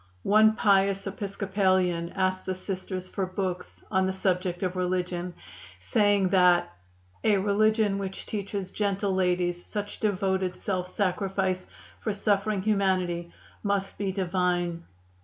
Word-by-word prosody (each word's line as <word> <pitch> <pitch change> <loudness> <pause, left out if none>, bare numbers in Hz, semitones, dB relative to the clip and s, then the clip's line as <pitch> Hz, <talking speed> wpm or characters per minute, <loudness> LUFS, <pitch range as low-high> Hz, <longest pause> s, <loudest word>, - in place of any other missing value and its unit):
One 215 +1 +5
pious 195 -2 +3
Episcopalian 190 -3 0
asked 185 -1 0
the 185 - -1
Sisters 185 -1 -5
for 190 0 -2
books 185 -1 -4
on 190 0 +2
the 190 - -1
subject 185 -1 -1
of 185 0 -1
religion, 180 -1 -2 0.4
saying 195 - +2
that 180 - +4 0.5
'a 210 -2 +4
religion 210 +1 +2
which 190 -1 -5
teaches 200 -2 -4
gentle 200 -1 0
ladies 180 -1 +1
such 205 0 -5
devoted 190 -3 0
self 185 -2 -2
sacrifice 190 -1 -1 0.3
for 215 - -2
suffering 200 0 0
humanity 185 -4 +1 0.3
must 200 -1 -1
be 200 -2 0
Divine. 175 -2 -1
190 Hz, 120 wpm, -27 LUFS, 180-200 Hz, 0.5 s, One